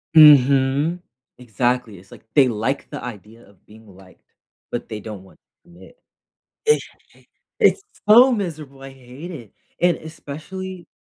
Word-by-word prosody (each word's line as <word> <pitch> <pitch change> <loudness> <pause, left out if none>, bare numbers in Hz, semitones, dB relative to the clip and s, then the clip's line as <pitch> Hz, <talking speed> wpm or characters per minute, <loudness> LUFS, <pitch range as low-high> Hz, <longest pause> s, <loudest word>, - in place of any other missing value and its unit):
Mhm, 140 +2 +6 0.4
exactly, 120 -3 -2
it's 95 - -21
like - - -14
they 135 -3 +5
like 120 +5 -3
the - - -7
idea 115 -1 -10
of 100 -3 -24
being 110 +1 -18
liked, 95 -1 -19 0.5
but - - -5
they 110 - -5
don't 105 -3 -9
want 95 - -20
to 175 - -32
commit. 175 - -17 0.7
Exactly, 450 - -2 0.3
it's 400 - +4 0.3
so 245 +5 +8
miserable! 155 - -5
I 135 - -9
hate 135 +5 -12
it, 120 - -10 0.3
and 175 -1 +3
especially 170 +4 -9
135 Hz, 140 wpm, -21 LUFS, 110-170 Hz, 0.7 s, so